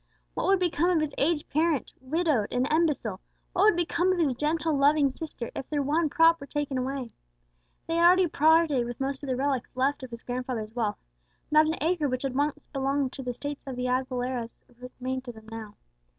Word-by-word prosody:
What - - -2
would 390 0 +5
become 350 -1 +1
of 350 -3 +3
his 305 -2 -2
aged 300 +1 +1
parent, 315 -2 +1
widowed 285 -5 +1
and 250 +1 +1
imbecile 300 - +1 0.3
what 380 +2 +3
would 430 - +6
become 350 +1 +1
of 370 - 0
his 305 -6 +2
gentle 305 +4 0
loving 285 0 +4
sister, 280 -5 -7
if 265 - -6
their 290 -2 0
one 305 +3 +1
prop 330 +2 +4
were 280 - -8
taken 285 -2 -2
away? 260 -1 -3 0.8
They 330 - -1
had 340 0 +6
already 365 +1 +6
parted 310 -5 +3
with 240 - -6
most 270 0 -2
of 285 - -6
the 255 - +1
relics 265 -1 -1
left 275 +3 +1
of 260 - -7
his 235 0 -9
grandfather's 245 -3 -4
wealth; 220 -4 -1 0.5
not 310 +1 +6
an 320 - 0
acre 320 -2 +1
which 255 +1 -2
had 270 -2 -2
once 290 +2 -1
belonged 275 -1 0
to - - -6
the 250 - -5
estates 285 +4 -5
of 265 - -4
the 250 0 -3
Aguileras 250 -2 -2 0.2
remained 255 +1 -5
to 245 - -7
them 220 -1 -14
now. 220 -2 -8
280 Hz, 210 wpm, -27 LUFS, 255-315 Hz, 0.8 s, would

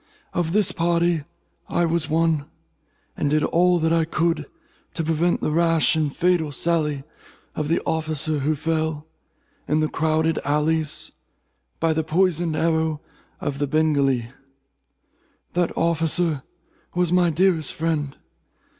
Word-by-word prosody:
Of 170 -2 -1
this 205 0 +3
party 170 -2 +1 0.4
I 175 - +1
was 165 -1 0
one, 160 -2 +1 0.7
and 145 - -1
did 150 +1 +2
all 175 -1 +2
I 165 -1 +3
could 165 -1 -1 0.5
to 165 - -1
prevent 165 +2 +1
the - - 0
rash 165 0 +3
and 155 -2 0
fatal 170 -1 +1
sally 150 -2 0 0.5
of 150 - -3
the 165 - +2
officer 155 -1 -1
who 150 +3 0
fell, 160 0 -2 0.6
in 150 +2 +2
the 155 - +2
crowded 160 +1 0
alleys, 150 +1 0 0.7
by 165 -1 +2
the 160 0 0
poisoned 170 0 +1
arrow 160 -1 +1 0.4
of 145 -1 -4
a 145 - +1
Bengalee. 140 -6 +1 1.2
That 175 -1 +1
officer 165 -2 +1 0.5
was 175 -1 +1
my 180 -1 +4
dearest 165 -2 +1
friend. 155 -4 -2
160 Hz, 130 wpm, -23 LUFS, 150-170 Hz, 1.2 s, my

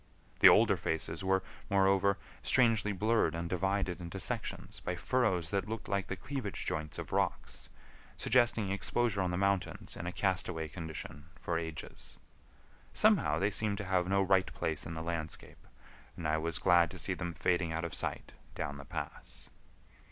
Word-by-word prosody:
The - - +10
older - - +5
faces 80 +4 -3
were, 95 0 +2 0.3
moreover, 100 0 +3 0.2
strangely 115 -5 +3
blurred 110 0 +1
and 85 0 -3
divided 95 0 -1
into 85 -1 -6
sections - - -3
by - - -3
furrows 95 -10 0
that 100 +1 -1
looked 110 -1 -5
like 100 -1 -1
the 95 - -3
cleavage 130 -1 -5
joints 75 -2 -3
of - - -6
rocks, 60 0 -2 0.5
suggesting 120 -5 +3
exposure 100 +1 0
on 90 - 0
the 90 - -1
mountains 100 0 -1
in 85 - -5
a - - -2
castaway 90 -4 -1
condition 80 -2 -7
for 85 -1 -1
ages. 80 -2 -7 0.8
Somehow 75 +1 +4
they 100 +5 +1
seemed 105 0 +1
to 100 - -4
have 90 -1 +1
no 100 +1 +3
right 95 -1 +2
place 80 +1 -2
in 85 - -6
the 80 - -4
landscape, 80 -2 -5 0.5
and 80 - -3
I 80 0 +1
was 80 0 -2
glad 85 -2 +4
to 95 - -9
see 95 - +2
them 85 -2 -4
fading 90 -2 +1
out 80 +1 -2
of 85 - -5
sight - - -3 0.2
down 70 - -4
the 70 - -10
pass. - - -7
90 Hz, 170 wpm, -32 LUFS, 80-100 Hz, 0.8 s, The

